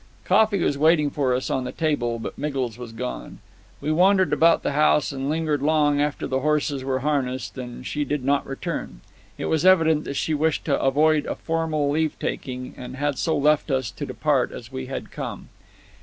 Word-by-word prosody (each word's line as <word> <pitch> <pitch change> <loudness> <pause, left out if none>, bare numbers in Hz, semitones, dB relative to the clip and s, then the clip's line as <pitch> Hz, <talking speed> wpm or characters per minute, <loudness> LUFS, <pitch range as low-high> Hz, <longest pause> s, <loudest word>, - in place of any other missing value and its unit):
Coffee 210 +2 +4
was 140 - 0
waiting 155 -1 +4
for 130 -4 +1
us 130 - -2
on 130 - 0
the 125 - -4
table, 130 -7 -1
but 115 - -6
Miggles 135 -6 -2
was 120 -1 -8
gone. 125 +2 -6 0.4
We 155 - -2
wandered 185 +3 +4
about 165 +1 +4
the - - 0
house 150 0 +3
and 135 0 -3
lingered 155 -2 0
long 145 -1 +3
after 150 0 -1
the 130 - -1
horses 145 -1 0
were 130 0 -1
harnessed, 130 -3 -1
but 125 -1 -8
she 150 +3 -2
did 145 -3 -3
not 140 +1 +1
return. 135 - -5 0.4
It - - -4
was 160 0 +1
evident 165 -5 +4
that 140 - -4
she 160 - -1
wished 155 +1 0
to 140 -3 +1
avoid 150 +3 +3
a - - -2
formal 160 -3 -1
leave 155 +1 0
taking, 125 -2 -4
and 125 0 -8
had 145 0 -1
so 160 - +1
left 150 +2 +2
us 130 -5 0
to - - -6
depart - - +1
as - - -9
we 65 - -5
had - - -6
come. - - -6
145 Hz, 200 wpm, -24 LUFS, 130-155 Hz, 0.4 s, Coffee